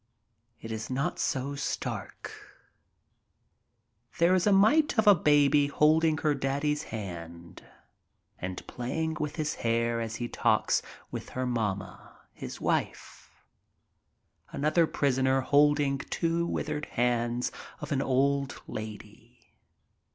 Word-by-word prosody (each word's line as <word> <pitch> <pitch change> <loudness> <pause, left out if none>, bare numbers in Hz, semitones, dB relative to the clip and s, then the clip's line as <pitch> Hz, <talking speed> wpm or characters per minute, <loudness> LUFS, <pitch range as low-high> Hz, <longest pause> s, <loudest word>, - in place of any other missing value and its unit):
It 115 - -8
is 110 -1 -5
not 140 +7 -2
so 140 0 -1
stark. 140 0 -4 1.9
There 170 +1 +4
is 185 +1 +2
a - - +5
mite 240 +10 +4
of 220 - +3
a 205 - +9
baby 145 -3 +4
holding 155 +2 +3
her 150 0 +1
daddy's 145 +2 -1
hand 85 -5 -8 0.8
and 90 0 -5
playing 155 +6 -3
with 150 -1 -3
his 155 -2 -1
hair 115 0 +1
as 115 0 -4
he 120 0 -3
talks - - +1 0.3
with - - -6
her 130 - 0
mamma, 110 -6 -3 0.2
his - - -8
wife. - - -3 1.2
Another 155 +3 +2
prisoner 130 -2 +1
holding 145 0 +3
two 170 0 -1
withered 150 -2 -3
hands 120 0 0 0.3
of 150 +1 -7
an 135 -2 +1
old 140 +1 +1
lady. 110 +2 -10
140 Hz, 115 wpm, -29 LUFS, 120-155 Hz, 1.9 s, a